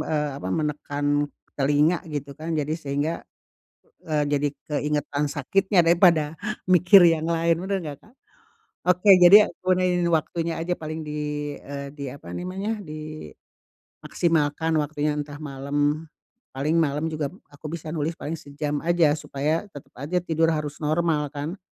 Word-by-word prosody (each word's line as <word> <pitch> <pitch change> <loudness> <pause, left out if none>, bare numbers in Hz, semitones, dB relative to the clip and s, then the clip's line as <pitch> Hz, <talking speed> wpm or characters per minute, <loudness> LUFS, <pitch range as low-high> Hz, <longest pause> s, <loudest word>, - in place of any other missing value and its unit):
eee, 150 -1 0
apa, 95 - -5
menekan 145 +2 -2 0.5
telinga 145 +5 +3
gitu 145 -2 -5
kan, 160 +3 -5
jadi 150 0 -1
sehingga, 145 0 -2 0.9
eee, 150 -2 +1
jadi 145 0 +2 0.2
keingetan 150 0 -1
sakitnya 185 +6 +2
daripada 165 -3 +4 0.3
mikir 185 +1 +6
yang 165 -2 +3
lain, 165 0 +1
benar 195 +2 -1
nggak 145 -3 -6
Kak? 225 - -22 0.8
Oke, 180 +3 +4
jadi, 180 +3 +10 0.2
aku 185 0 0
iniin 180 -1 +1
waktunya 165 0 0
aja, 170 +2 -2
paling, 155 -1 -5
di 150 0 -5 0.4
eee, 140 0 -7
di, 145 -1 -8
apa 125 -10 -10
namanya, 195 - -3 1.0
dimaksimalkan 160 -1 0
waktunya, 150 0 -1
entah 145 0 -6
malam. 145 +2 -1 0.5
Paling 150 +5 0
malam 150 0 0
juga 155 -2 -3 0.2
aku 145 +1 -9
bisa 165 -1 -6
nulis 155 0 -2
paling 160 0 -5
sejam 145 0 -4
aja, 170 -3 +3
supaya 150 +3 -2
tetap 145 - -12
aja 150 +7 -2
tidur 165 -1 +1
harus 150 -1 -3
normal, 155 -1 0
kan. 150 +6 -4
155 Hz, 140 wpm, -24 LUFS, 145-170 Hz, 1.0 s, jadi